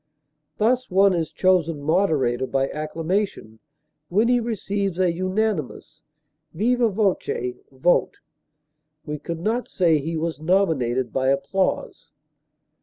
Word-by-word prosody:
Thus 245 +4 +1
one 195 +1 +4
is 165 -3 -2
chosen 175 -5 +2
moderator 145 -7 +1
by 135 0 0
acclamation 155 - -3 0.5
when 215 +6 +2
he 245 0 +4
receives 200 -5 -2
a 185 -2 +2
unanimous 185 - -2 0.5
viva 235 +5 +2
voce 185 - -1
vote; 135 +7 +1 0.9
we 150 -1 -4
could 165 +2 -5
not 230 +6 -1
say 165 -4 +2
he 160 +3 -3
was 160 -1 -3
nominated 155 -9 +1
by 130 0 0
applause. 140 +8 -1
175 Hz, 110 wpm, -23 LUFS, 150-200 Hz, 0.9 s, one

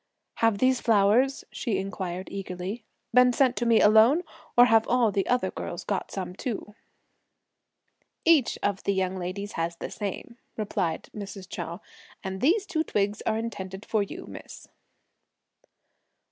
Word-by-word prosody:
"Have 225 -3 +3
these 255 +2 +2
flowers," 225 +5 +3
she 220 -6 -2
inquired 185 -1 -4
eagerly, 195 +3 -5 0.3
"been 250 +1 +6
sent 255 -1 +3
to 240 - 0
me 230 -1 +5
alone, 220 +10 +6 0.3
or 245 - +9
have 225 -2 +4
all 245 -3 +3
the 195 -1 0
other 245 -7 +1
girls 175 - -6
got 200 -2 -2
some 185 -2 -5
too?" 215 -2 -5 1.5
"Each 320 -7 +4
one 205 - +3
of 195 - -14
the 200 - +1
young 190 0 0
ladies 190 +3 -4
has 165 +1 -2
the - - -7
same," 210 +4 -6 0.2
replied 195 -6 -2
Mrs. 195 -2 -7
Chou; 170 +1 -6 0.4
"and 190 0 -5
these 375 +9 +3
two 340 -5 -1
twigs 205 -6 -1
are 220 - +2
intended 195 -3 -5
for 220 - +1
you, 200 - -5
miss." - - -11
205 Hz, 150 wpm, -27 LUFS, 190-240 Hz, 1.5 s, or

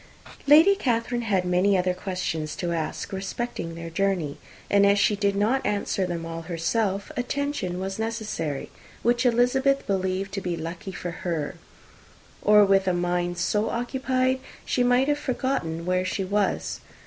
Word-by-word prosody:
Lady 315 +7 +8
Catherine 240 - 0
had 195 -5 +1
many 185 +2 +3
other 180 0 +1
questions 180 -5 -3
to 175 -1 -2
ask 165 +3 -3
respecting 190 -2 -4
their 165 0 -7
journey; 180 -5 -1 0.3
and 200 0 +4
as 200 0 +5
she 205 +1 +3
did 200 -1 +1
not 220 +7 +1
answer 200 -2 0
them 170 -2 -4
all 165 0 -5
herself 190 +4 -1
attention 250 -8 -2
was 195 +2 -4
necessary 215 -10 -3 0.3
which 240 +2 +3
Elizabeth 265 +3 +2
believed 190 0 -1
to 195 - -2
be 175 -2 -2
lucky 170 +4 -6
for 180 -1 -5
her; 165 -3 -3 0.9
or, 210 0 +6
with 195 -1 +3
a 185 - +3
mind 175 0 -1
so 210 +5 +1
occupied, 260 +1 0 0.3
she 250 - +1
might 245 +2 +3
have 295 0 +1
forgotten 245 - -2
where 185 0 +1
she 190 +1 -2
was. 200 +1 -1
195 Hz, 155 wpm, -25 LUFS, 175-240 Hz, 0.9 s, Lady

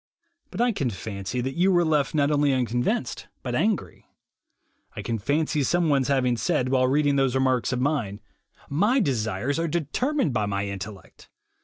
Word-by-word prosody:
But 195 - -4
I 245 0 +3
can 140 - -1
fancy 100 +3 -4
that 130 +2 -3
you 185 +3 +3
were 175 -2 +3
left 150 -2 +1
not 145 0 +2
only 145 -1 +3
unconvinced, 125 - -1 0.2
but - - -3
angry. 195 - -1 0.9
I - - -5
can 115 -1 -2
fancy 150 +6 0
someone's' 145 -3 +2
having 130 -3 +1
said, 130 -3 0
while 130 -1 +3
reading 145 +1 +2
those 135 -2 +2
remarks 130 -2 +1
of 125 - -1
mine: 125 -8 -1 0.5
"My 210 - +2
desires 125 - -1
are 170 - 0
determined 170 - -1
by 105 -3 0
my 100 0 -1
intellect. 100 0 -8
135 Hz, 165 wpm, -25 LUFS, 120-155 Hz, 0.9 s, I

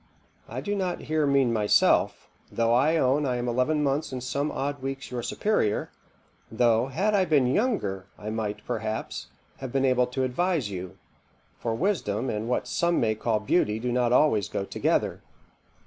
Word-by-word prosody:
I - - -4
do 205 - -2
not 185 -3 -2
here 155 -1 0
mean 135 -4 +3
myself, 105 -2 +3 0.2
though 115 0 +1
I 140 +7 +3
own 135 +1 +2
I 125 - 0
am 120 0 -2
eleven 130 +6 +1
months 140 +2 0
and 130 -1 -5
some 140 +3 -1
odd 140 0 -3
weeks 135 -1 -5
your 125 -1 -3
superior; 120 - 0 0.6
though, 115 +1 +3
had 190 +11 0
I 200 -2 +4
been 150 -7 +3
younger, 125 - 0
I 105 +1 -6
might, 105 -1 -4
perhaps, 110 0 -4 0.3
have 130 -2 -6
been 135 +1 +1
able 125 -1 +3
to 130 +1 -2
advise 140 - 0
you; 90 -1 -6 0.6
for 115 -1 -2
wisdom 130 - -1
and 110 +2 -3
what 125 - -1
some 170 0 +1
may 110 -1 +2
call 110 0 -1
beauty 105 -2 +1
do 120 +2 -2
not 120 -1 +1
always 125 -7 +3
go 100 - -3
together. - - 0
125 Hz, 175 wpm, -26 LUFS, 110-150 Hz, 0.6 s, I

